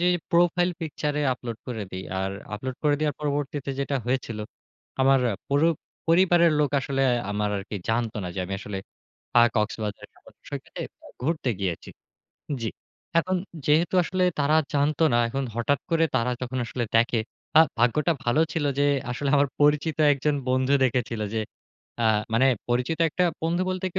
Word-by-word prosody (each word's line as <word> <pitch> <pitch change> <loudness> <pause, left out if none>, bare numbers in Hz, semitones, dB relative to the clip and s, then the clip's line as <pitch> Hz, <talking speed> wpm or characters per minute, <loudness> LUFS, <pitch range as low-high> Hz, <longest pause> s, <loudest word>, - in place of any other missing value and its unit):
যে, 180 - +4 0.2
profile 175 +1 +3
picture 150 -2 -2
এ - - 0
upload 120 -3 -7
করে 115 -4 -4
দিই। 95 0 -6 0.2
আর 95 0 -1 0.2
আপলোড 130 +4 -5
করে 145 -1 +3
দেওয়ার 150 -1 0
পরবর্তীতে 145 -1 -2
যেটা 140 0 -1
হয়েছিল। 125 -4 -1 0.6
আমার 135 0 +5 0.3
পুরো 145 +4 +3 0.4
পরিবারের 170 -1 +5
লোক 145 -3 +2
আসলে 135 0 -1 0.3
আমার 105 0 0
আরকি 100 +1 -5
জানতো 115 -1 0
না - - -3
যে, - - -5
আমি 95 - -6
আসলে 100 -2 -5 0.6
আ - - +8
কক্সবাজার 105 0 -2
সমুদ্র - - -21
সৈকতে - - -7 0.4
ঘুরতে 150 -3 0
গিয়েছি। 90 -4 -3 0.7
জ্বী। 110 - -2 0.5
এখন 185 +2 0 0.3
যেহেতু 160 +5 +3
আসলে 185 +2 0 0.2
তারা 150 +2 +3 0.2
জানতো 145 +2 +2
না - - +4
এখন 135 +3 -2
হঠাৎ 130 +4 +1
করে 165 0 +4
তারা 125 +1 +1
যখন 125 +1 -3
আসলে 120 +1 -3
দেখে 115 0 +3 0.4
আ - - +11 0.2
ভাগ্যটা 150 +8 +3
ভালো 120 +6 +3
ছিল 155 -3 0
যে, 145 - +4 0.3
আসলে 140 +3 -2
আমার 140 0 +4
পরিচিত 150 +1 +3 0.2
একজন 145 +2 0
বন্ধু 130 +2 +2
দেখেছিল 120 -3 0
যে, 110 - 0 0.6
আ - - +3 0.3
মানে 130 +4 +4 0.2
পরিচিত 125 +6 0
একটা 180 - 0 0.2
বন্ধু 170 +2 +1
বলতে, 185 0 -2
140 Hz, 160 wpm, -25 LUFS, 120-155 Hz, 0.7 s, আ